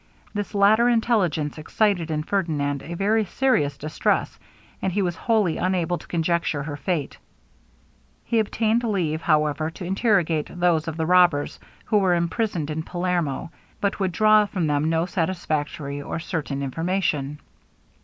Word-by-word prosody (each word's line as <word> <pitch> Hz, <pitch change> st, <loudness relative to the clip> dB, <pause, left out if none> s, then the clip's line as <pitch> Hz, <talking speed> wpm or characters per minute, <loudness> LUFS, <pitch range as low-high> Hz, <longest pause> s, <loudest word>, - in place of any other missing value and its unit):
This 205 Hz, 0 st, -4 dB
latter 215 Hz, +4 st, +5 dB
intelligence 185 Hz, -, +1 dB
excited 175 Hz, +1 st, 0 dB
in 155 Hz, -1 st, -1 dB
Ferdinand 150 Hz, -7 st, -1 dB
a 170 Hz, +4 st, -7 dB
very 215 Hz, +4 st, +2 dB
serious 180 Hz, -, +1 dB
distress, 155 Hz, +2 st, -1 dB, 0.4 s
and 190 Hz, -, 0 dB
he 200 Hz, +2 st, 0 dB
was 175 Hz, -2 st, -1 dB
wholly 210 Hz, -5 st, +1 dB
unable 180 Hz, -1 st, 0 dB
to -, -, -14 dB
conjecture 170 Hz, -3 st, 0 dB
her 145 Hz, 0 st, -5 dB
fate. 145 Hz, 0 st, -3 dB, 1.1 s
He 230 Hz, -, +1 dB
obtained 220 Hz, +2 st, +1 dB
leave, 175 Hz, -8 st, -1 dB
however, 155 Hz, 0 st, +1 dB
to 175 Hz, +3 st, -8 dB
interrogate 180 Hz, -5 st, +1 dB
those 170 Hz, -2 st, +2 dB
of 165 Hz, -1 st, -4 dB
the 160 Hz, -, 0 dB
robbers, 175 Hz, -4 st, +3 dB, 0.3 s
who 210 Hz, -, +3 dB
were 185 Hz, -3 st, +3 dB
imprisoned 170 Hz, -2 st, -1 dB
at 160 Hz, +1 st, -3 dB
Palermo, 175 Hz, -4 st, -2 dB, 0.3 s
but 200 Hz, -, 0 dB
could 190 Hz, -2 st, 0 dB
draw 215 Hz, +2 st, +4 dB
from 185 Hz, -4 st, -2 dB
them 150 Hz, +1 st, +1 dB
no 165 Hz, +1 st, +1 dB
satisfactory 155 Hz, -5 st, -2 dB
or 145 Hz, -, -4 dB
certain 155 Hz, -4 st, -3 dB
information. 150 Hz, -1 st, -1 dB
170 Hz, 145 wpm, -24 LUFS, 155-200 Hz, 1.1 s, latter